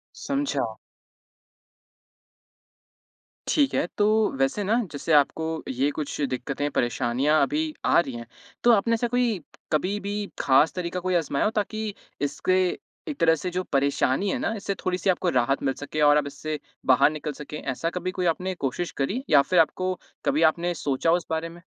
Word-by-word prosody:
समझा। 280 0 -2 2.7
ठीक 285 -3 +2
है। - - +2
तो 205 - +3 0.3
वैसे 135 +10 +1
ना 200 +3 +1 0.2
जैसे 150 +2 -2
आपको 160 +2 +2
ये 130 +3 +1
कुछ 150 -1 -5
दिक़्क़तें, 140 +1 -2
परेशानियाँ 130 +5 +1
अभी 155 +3 -1
आ - - +5
रही 140 -6 -1
हैं, 115 -1 -7 0.4
तो 240 - +6
आपने 230 +1 +3
ऐसा 230 +1 +1
कोई 240 -4 +1 0.3
कभी 185 +7 0
भी 200 0 -4 0.3
ख़ास 140 +3 +4
तरीका 180 0 -3
कोई 185 0 -1
अजमाया 150 -4 +1
हो 210 - +2
ताकि 215 0 -2 0.3
इसके 145 +6 0 0.5
एक 295 -3 -4
तरह 165 -1 +5
से 180 +4 -4
जो 180 +1 -2
परेशानी 140 +4 +1
है - - 0
ना, 225 - -1
इससे 200 -1 -3
थोड़ी-सी 185 +1 0
आपको 180 0 +2
राहत 130 -1 +1
मिल 135 -1 +1
सके 145 +3 -4
और 145 0 +6
अब 145 -1 0
इससे 150 +2 -5 0.3
बाहर 130 +2 +5
निकल 155 0 -4
सकें? 150 +1 -8
ऐसा 145 +6 -2
कभी 180 +1 -3
कोई 185 -1 -2
आपने 180 +3 0
कोशिश 170 +3 -3
करी 210 - -1
या 145 -3 +7
फ़िर 180 +6 +2
आपको 185 +3 +2 0.3
कभी 150 - +2
आपने 175 +1 -2
सोचा 145 -1 -1
हो 165 - +5
उस 175 - -7
बारे 160 +1 -2
में? 170 +1 -13
160 Hz, 175 wpm, -25 LUFS, 140-185 Hz, 2.7 s, या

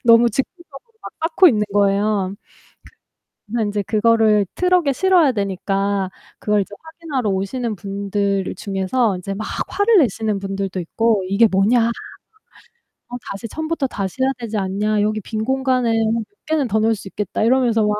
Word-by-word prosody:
너무 235 0 +6
집중적으로 310 - -6
막 - - -7 0.2
쌓고 365 +2 +6
있는 210 -5 +1
거예요. 200 -1 +1 1.1
그래서 230 +1 -1
인제 205 0 -1
그거를 215 -1 +3
트럭에 360 -6 +2
실어야 350 -4 +3
되니까 195 -1 -1 0.3
그걸 210 -1 +1
이제 205 - -9
확인하러 320 -7 -4
오시는 215 +4 -2
분들 200 0 -2
중에서 195 +2 -1
이제 195 +2 -5
막 215 - -5 0.2
화를 405 +3 +3
내시는 220 - +1
분들도 195 -1 -4
있고 215 +3 0
"이게 215 +3 +4
뭐냐? 220 +5 +3 1.2
어 245 - -6
다시 200 +3 -6
처음부터 315 -1 -2
다시 200 +2 -4
해야 265 - +3
되지 225 -3 -4
않냐. 205 +2 0
여기 215 +1 0
빈 220 +2 -4
공간에 260 -2 +1 0.2
몇 230 - -1 0.2
개는 305 -5 0
더 215 +1 +1
넣을 225 +1 +2
수 195 -2 -9
있겠다." 210 +1 -3
이러면서 235 -2 +3
막 210 - +1
215 Hz, 335 characters per minute, -20 LUFS, 200-255 Hz, 1.2 s, 너무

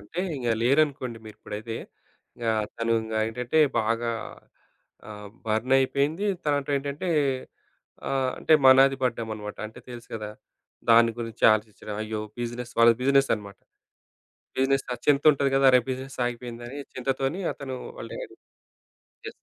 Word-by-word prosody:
అంటే 155 - -5 0.2
ఇంగ 120 -3 -3
లేరనుకోండి 135 -3 +1
మీరిప్పుడైతే. 110 +1 -7 0.6
ఇంగా 115 -2 0 0.2
తను 115 0 0
ఇంగ 110 0 -6
ఏంటంటే 125 +6 -1 0.2
బాగా 115 +2 0 1.0
ఆహ్, 105 -1 -9 0.2
బర్నయిపోయింది, 135 - +1 0.2
తర్వాతేటంటే 145 +2 -1 1.0
ఆహ్, 135 -1 +1
అంటే - - +1
మనాది 135 +1 +7
పడ్డామనమాట, 110 -4 -3
అంటే 110 - -13
తెలుసు 120 -1 -10
గదా! 105 -1 -5 0.6
దాని 115 0 +7
గురించి 115 -2 -4
ఆలోచించడం, 105 -1 -4
అయ్యో! 110 0 -4 0.2
బిజినెస్ 120 0 -5
వాళ్ళది 115 0 +6
బిజినెస్ 140 +1 +3
అనమాట. 100 -2 -10 1.0
బిజినెస్‌లో 135 -1 +1
ఆ - - -22
చింతుంటది 140 -1 +4
గదా! 135 0 +4
అరే! 125 - +7
బిజినెస్ 130 +1 -6
ఆగిపోయిందని 120 +2 -6 0.2
చింతతోని 135 +6 -2
అతను 130 -2 -6 0.2
వాళ్ల - - -7
డాడీ - - -9 0.9
యెస్. - - -8
125 Hz, 120 wpm, -26 LUFS, 115-135 Hz, 1.0 s, మనాది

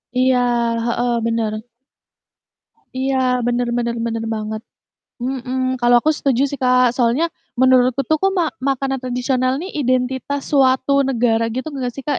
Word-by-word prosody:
Iya, 255 0 +3 0.5
heeh, 240 +1 0
bener. 230 -2 -1 1.4
Iya, 265 +1 -1 0.3
bener 245 0 0
bener 235 0 -1
bener 230 -1 -3
banget. 215 0 -4 0.6
Mhm, 255 0 -2
kalau 240 0 +5
aku 310 - +2
setuju 275 -3 0
sih 285 - -5
Kak, 250 -1 +3
soalnya 245 +6 +2 0.4
menurutku 255 0 +4
tuh, 315 -1 +1
kok 390 0 +2
ma 340 -3 +2
makanan 270 0 -1
tradisional 255 0 0
nih 370 +4 -6
identitas 260 +2 -1
suatu 265 0 +3 0.2
negara 230 -3 +1
gitu 260 +4 -4
nggak 255 -3 -3
sih, 275 - -7
Kak? 290 -2 -1
255 Hz, 145 wpm, -19 LUFS, 240-270 Hz, 1.4 s, kalau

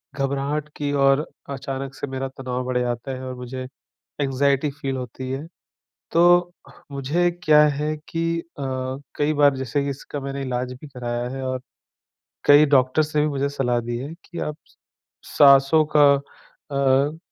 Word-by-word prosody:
घबराहट 140 +2 -1
की 145 -1 -2
और 135 +2 +4 0.2
अचानक 135 0 -5
से - - -5
मेरा 130 0 -3
तनाव 125 -1 -3
बढ़ 125 -1 -1
जाता 120 +2 -2
है 130 0 -6
और 130 - -5
मुझे 125 +1 -6 0.5
एंग्ज़ायटी 140 +1 +1
फ़ील 135 -1 -4
होती 130 +1 -6
है। 135 +4 -4 0.7
तो 175 +1 +5 0.4
मुझे 145 +6 +1
क्या 150 -1 +6
है 150 +1 -1
कि 165 0 -1
अ, - - -4 0.7
कई 150 +1 +1
बार 145 -2 +4
जैसे 130 +2 -1
कि 140 - -2
इसका 140 +1 -6
मैंने 140 0 -5
इलाज 125 -1 -3
भी 150 - -9
कराया 120 -2 -4
है 135 - -5
और 130 -1 -3 0.8
कई 145 +1 +8
डॉक्टर्स 135 +4 +2
से 150 - +3
भी 150 - +2
मुझे 140 -1 -1
सलाह 125 -4 0
दी 120 0 -4
है 140 +6 -6
कि 175 - -8
आप 150 - -3
स - - -26 0.6
साँसों 140 +2 +7
का 145 -1 +7
अ, 140 +1 -1
140 Hz, 165 wpm, -23 LUFS, 130-150 Hz, 0.8 s, कई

